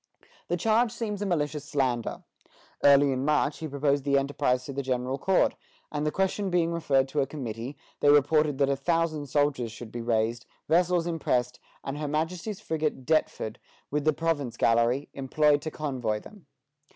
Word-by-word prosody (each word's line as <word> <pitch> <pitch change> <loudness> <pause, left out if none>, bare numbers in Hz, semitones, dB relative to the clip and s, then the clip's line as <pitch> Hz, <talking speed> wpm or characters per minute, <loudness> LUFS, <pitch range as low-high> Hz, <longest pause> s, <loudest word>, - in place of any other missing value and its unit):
The 175 - 0
charge 225 +5 +2
seems 210 -4 -4
a 205 - -1
malicious 150 -4 -1
slander. 130 -5 -1 0.6
Early 140 0 +6
in 130 0 -1
March 150 0 +1
he 160 - -4
proposed 140 -1 0
the 140 0 +2
enterprise 135 -2 0
to 140 - -6
the 140 - -2
General 130 0 -2
Court; 190 +4 +3 0.4
and 150 0 -1
the - - +1
question 190 +2 0
being 170 -2 +1
referred 140 -5 +2
to 145 - -1
a 135 - 0
committee, 125 -1 -6 0.2
they 145 - +4
reported 150 0 +4
that 140 -1 +2
a 140 - +2
thousand 155 0 0
soldiers 140 -4 0
should 115 0 -9
be 120 - -5
raised, 115 0 0 0.2
vessels 175 0 +3
impressed, 125 -7 -1 0.2
and 140 +2 -4
her 150 - -2
Majesty's 165 +7 -2
frigate 155 -5 -2
"Deptford," 155 -8 0 0.3
with 150 0 0
the 155 - +4
province 145 -6 -2
galley, 115 +4 +2
employed 145 +2 +2
to 155 - -4
convoy 130 -9 -2
them. 195 - -15
145 Hz, 175 wpm, -27 LUFS, 130-160 Hz, 0.6 s, Early